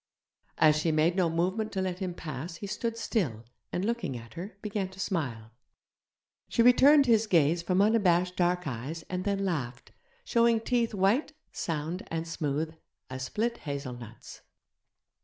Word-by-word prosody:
As 155 -1 +5
she 160 +1 +1
made 155 +3 +2
no 180 -3 +2
movement 185 +7 -1
to 190 - -1
let 185 -1 -3
him 185 -3 -3
pass 155 +2 -6
he 200 - -7
stood 225 +3 -3
still, 150 - -1 0.3
and, 180 - -1
looking 230 - -2
at 115 0 -12
her, 185 +3 -8
began 205 -3 -2
to 190 0 -15
smile. 125 - -3 1.0
She 230 - +3
returned 275 +4 +7
his 225 -3 +3
gaze 165 -2 +3
from 185 +3 +2
unabashed 180 -5 +3
dark 180 0 +1
eyes, 140 +5 -5
and 185 0 -2
then 200 -1 0
laughed, 125 -10 -3 0.3
showing 235 -1 +3
teeth 230 -1 0
white, 205 +11 +2 0.2
sound, 165 +3 -3
and 165 0 -3
smooth 155 0 -2 0.4
as 130 0 -5
split 230 - -1
hazelnuts. 125 -6 -7
180 Hz, 155 wpm, -29 LUFS, 155-210 Hz, 1.0 s, returned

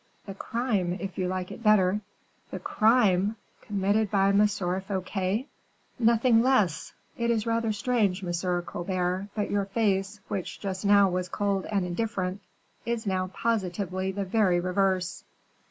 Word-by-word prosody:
"The 195 - -6
crime, 200 -4 -1
if 195 -1 -6
you 185 - 0
like 185 0 -3
it - - -9
better." 210 -2 +4 0.5
"The - - -5
crime! 215 -3 +3 0.3
committed 205 +1 0
by 195 0 +3
M. 205 +1 +5
Fouquet!" 190 +2 -2 0.5
"Nothing 230 0 +4
less. 215 - +1 0.3
It 235 0 0
is 225 -2 +1
rather 230 -1 0
strange, 205 -3 0
M. 175 0 -1
Colbert, 180 +2 -2
but 210 -2 -2
your 200 -1 +1
face, 195 -1 0
which 190 -3 -4
just 190 0 -4
now 200 -1 +6
was 180 0 -2
cold 200 0 -1
and 200 -3 0
indifferent, 190 0 -2 0.4
is 235 -1 -2
now 185 -2 0
positively 190 -3 -2
the 200 +1 -3
very 185 -3 +2
reverse." 185 0 0
195 Hz, 140 wpm, -27 LUFS, 185-215 Hz, 0.5 s, now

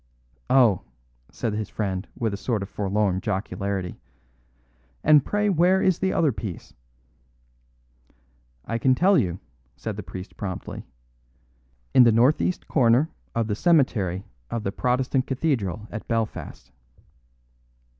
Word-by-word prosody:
"Oh!" 120 -8 +5 0.5
said 115 -3 -3
his 105 0 -3
friend, 95 -2 -3
with 110 -3 -1
a - - -1
sort 105 0 -2
of 100 - -8
forlorn 100 -2 0
jocularity; 100 -2 -3 1.0
"and 150 -2 +6
pray 205 +5 0
where 185 0 +4
is 185 -2 +2
the 190 0 +1
other 155 -4 +2
piece?" 100 -5 -7 1.9
"I 115 +1 -2
can 130 +2 +3
tell 195 +7 +4
you," 90 - +1 0.4
said 110 -3 -5
the - - -4
priest 90 +1 -9
promptly. 95 -3 -6 1.1
"In - - +7
the 120 -2 +7
northeast 130 +10 +2
corner 130 +3 +3 0.2
of 115 -1 +1
the 105 - -2
cemetery 105 - +2 0.3
of 115 - -3
the 95 - -1
Protestant 125 +3 0
Cathedral 115 - -1
at 110 - -7
Belfast." 110 - -3
115 Hz, 125 wpm, -25 LUFS, 100-135 Hz, 1.9 s, In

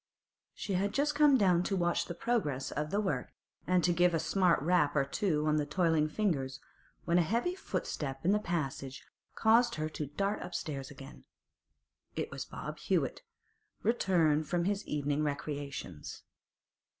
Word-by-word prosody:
She 200 - -4
had 200 +2 0
just 295 +1 +2
come 290 -2 +5
down 185 -6 +4
to 195 +2 -1
watch 175 -2 +1
the 175 - -6
progress 165 - -1
of 150 +1 -2
the 200 - 0
work, 200 -3 -2 0.3
and 180 -1 +3
to 175 - +3
give 175 0 +3
a - - +1
smart 180 +1 +3
rap 165 -3 +3
or 140 -2 +3
two 155 -1 0
on 155 0 +2
the 150 - +1
toiling 160 -1 +2
fingers, 140 -9 -1 0.5
when 170 +1 +3
a - - +5
heavy 235 - 0
footstep 140 - -4
in 185 - +4
the 210 - +3
passage 140 -7 -3 0.3
caused 235 +2 +4
her 155 0 -2
to 155 -1 -4
dart 195 +8 -2
upstairs 150 -6 -4
again. 135 0 -12 0.9
It - - -3
was - - -5
Bob - - -7
Hewett, - - 0 0.6
returned 170 -9 +2
from 175 -1 +1
his 200 +1 0
evening 145 0 -1
recreations. 140 - -5
170 Hz, 160 wpm, -32 LUFS, 150-195 Hz, 0.9 s, come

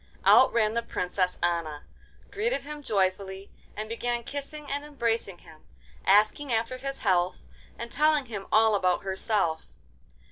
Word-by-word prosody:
Out - - +7
ran 220 -2 +2
the 235 - 0
Princess 180 -4 -2
Anna, 165 -4 -1 0.5
greeted 445 +5 -1
him 300 0 -7
joyfully, 195 -3 -1 0.3
and 215 +1 -4
began 240 +1 -2
kissing 290 +3 -6
and 285 +1 -3
embracing 235 -9 -2
him, 160 -3 -17 0.4
asking 215 +8 +4
after 230 +2 0
his 275 0 -4
health 180 -3 +1 0.3
and 235 0 -7
telling 300 -1 +3
him 210 -5 -7
all 220 0 +5
about 185 -3 +1
herself. 190 -4 -1
220 Hz, 140 wpm, -27 LUFS, 190-270 Hz, 0.5 s, Out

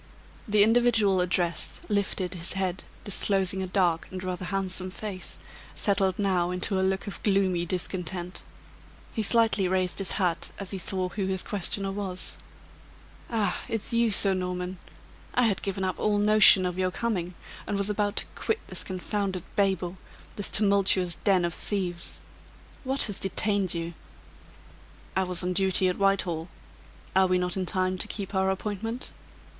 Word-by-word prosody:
The 210 -1 +5
individual 220 -4 +3
addressed 175 -2 0
lifted 200 -3 -1
his 170 0 +2
head, 190 -1 -2 0.2
disclosing 195 -1 +2
a 190 - -3
dark 180 -3 +1
and 185 0 -7
rather 185 0 -4
handsome 185 -1 -1
face, 195 0 -5 0.4
settled 195 -3 +2
now 185 -4 +1
into 180 +2 0
a - - +1
look 190 +1 0
of 200 - -7
gloomy 190 -4 +1
discontent. 180 0 -3 0.7
He 220 - -1
slightly 220 -3 +3
raised 185 0 0
his 195 -3 +4
hat 180 -4 0
as 195 -2 -6
he 195 - -3
saw 185 0 -1
who 190 +1 -3
his 190 -1 -1
questioner 195 -1 -1
was. 195 -2 -2 0.9
"Ah! 210 -6 0
it's 225 +1 -2
you, 235 0 +3
Sir 195 -1 +4
Norman! 180 0 -3 0.6
I 250 - +4
had 215 -5 +1
given 195 -1 -3
up 185 -1 -2
all 210 -1 +1
notion 205 -2 +6
of 180 0 -3
your 185 0 +2
coming, 185 -4 -2 0.3
and 205 - -1
was 200 +1 0
about 205 0 -1
to - - +1
quit 445 0 -1
this - - -2
confounded 190 0 -3
babel 190 -3 0 0.4
this 205 - 0
tumultuous 195 -3 +3
den 190 -4 +3
of 170 - -2
thieves. 180 -4 -3 0.7
What 265 +1 +2
has 205 -3 0
detained 195 -1 +1
you?" 170 0 -4 1.2
"I 190 - +2
was 180 0 +2
on 180 0 -1
duty 190 0 +3
at 180 - -3
Whitehall. 190 -4 +1 0.7
Are 190 0 +5
we 185 0 +2
not 180 -1 0
in 185 -2 -2
time 185 0 0
to - - 0
keep 200 -1 -5
our 190 0 +2
appointment?" 210 +5 -4
190 Hz, 160 wpm, -27 LUFS, 180-205 Hz, 1.2 s, notion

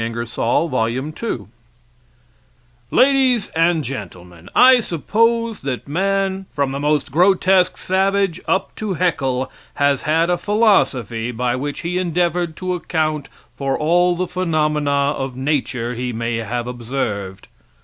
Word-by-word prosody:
Ingersoll's 120 +6 -1
Lecture 130 - +1
on 115 - 0
Human 135 +6 -4
Rights 115 - -4 1.4
Ladies 260 -4 +3
and 165 -1 +2
Gentlemen: 90 -9 -8
I 255 0 +7
suppose 230 - 0
that 135 -2 -4
man, 195 +3 -1
from 140 -2 -1
the 140 - -3
most 150 0 0
grotesque 185 +2 +3
savage 190 -1 0
up 190 - 0
to 210 -4 -3
Heckle, 135 -7 0 0.2
has 140 -1 +2
had 165 +3 +1
a 175 - 0
philosophy 135 - +1
by 125 +1 -1
which 145 +2 -4
he 180 +2 -2
endeavored 175 -1 0
to 185 +1 -3
account 155 -4 -2 0.2
for 135 -1 -2
all 175 +3 +2
the 185 +1 -1
phenomena 155 -5 0 0.3
of 135 -2 -5
nature 130 -4 -1
he 125 +1 -3
may 115 0 -2
have 115 +2 -3
observed. 115 -6 -4
150 Hz, 135 wpm, -20 LUFS, 125-185 Hz, 1.4 s, I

